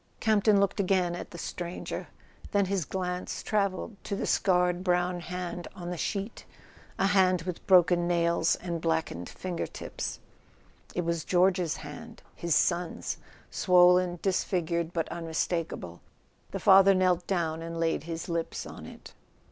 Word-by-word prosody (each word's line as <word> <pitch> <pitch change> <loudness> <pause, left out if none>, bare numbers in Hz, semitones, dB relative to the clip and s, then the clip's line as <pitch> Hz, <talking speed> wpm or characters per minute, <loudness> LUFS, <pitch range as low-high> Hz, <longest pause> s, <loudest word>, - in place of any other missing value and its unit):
Campton 215 -2 +4
looked 200 +1 +1
again 185 -3 +2
at - - -7
the - - -10
stranger; 175 +1 -5 0.5
then 200 -1 +3
his 190 -4 -1
glance 180 0 -4
travelled 200 0 -1
to 200 - -3
the - - -2
scarred 180 -1 +2
brown 180 -1 +1
hand 175 0 -5
on 175 -1 -6
the - - -3
sheet, 200 +5 -3 0.5
a - - +2
hand 185 -3 +3
with 180 -1 -6
broken 175 -2 +5
nails 170 -1 +2
and 170 -2 -5
blackened 160 - -1
finger 180 -2 -4
tips. - - -6 0.8
It 175 - -1
was 170 -1 -1
George's 180 -2 +2
hand, 225 +10 -10
his 170 -2 0
son's, 175 -1 0 0.3
swollen, 180 -1 +4
disfigured 170 -3 0
but 165 -2 -1
unmistakable. 165 - -3 0.5
The - - -4
father 195 0 +7
knelt 180 -1 +2
down 165 -4 -1
and 165 0 -5
laid 165 -2 0
his 165 +1 -5
lips 170 -2 -3
on - - -9
it. - - -12
180 Hz, 145 wpm, -29 LUFS, 170-185 Hz, 0.8 s, father